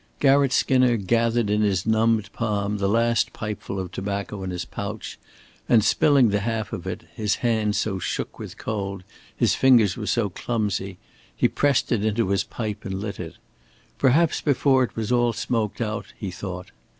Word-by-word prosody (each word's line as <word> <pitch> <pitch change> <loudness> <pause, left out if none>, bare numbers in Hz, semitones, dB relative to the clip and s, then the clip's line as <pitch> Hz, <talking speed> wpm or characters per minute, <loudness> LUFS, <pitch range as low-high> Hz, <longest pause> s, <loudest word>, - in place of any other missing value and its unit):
Garratt 140 -1 +4
Skinner 130 -2 +3
gathered 115 +1 +1
in 105 0 +2
his 100 -3 +1
numbed 110 -2 +2
palm 105 -2 -1
the 100 0 +1
last 115 0 +2
pipeful 105 -2 -5
of 90 -2 -5
tobacco 100 +1 -4
in 95 - -4
his 90 -1 -4
pouch 105 +2 -6 0.5
and, 115 -3 +5
spilling 135 +1 +4
the 105 0 +1
half 110 +1 -3
of 90 +1 -5
it 95 - -5
his 105 -2 0
hands 110 -3 +1
so 95 -3 -1
shook - - -4
with - - -8
cold, 100 -3 -4 0.3
his - - +2
fingers 120 -8 +4
were 105 -3 -5
so 115 -4 +1
clumsy 100 -2 -3 0.4
he - - +3
pressed 145 -1 +1
it 110 -4 +1
into 110 -1 +1
his 100 0 +1
pipe 110 -3 -5
and 95 0 -4
lit 100 0 -5
it. 80 -3 -7 0.6
Perhaps 145 +5 +3
before 135 -2 +3
it 125 - -4
was 110 0 -3
all 120 -1 +3
smoked 115 -1 -2
out 110 -1 -3
he 100 -5 -5
thought. 90 0 -7
110 Hz, 175 wpm, -24 LUFS, 100-120 Hz, 0.6 s, and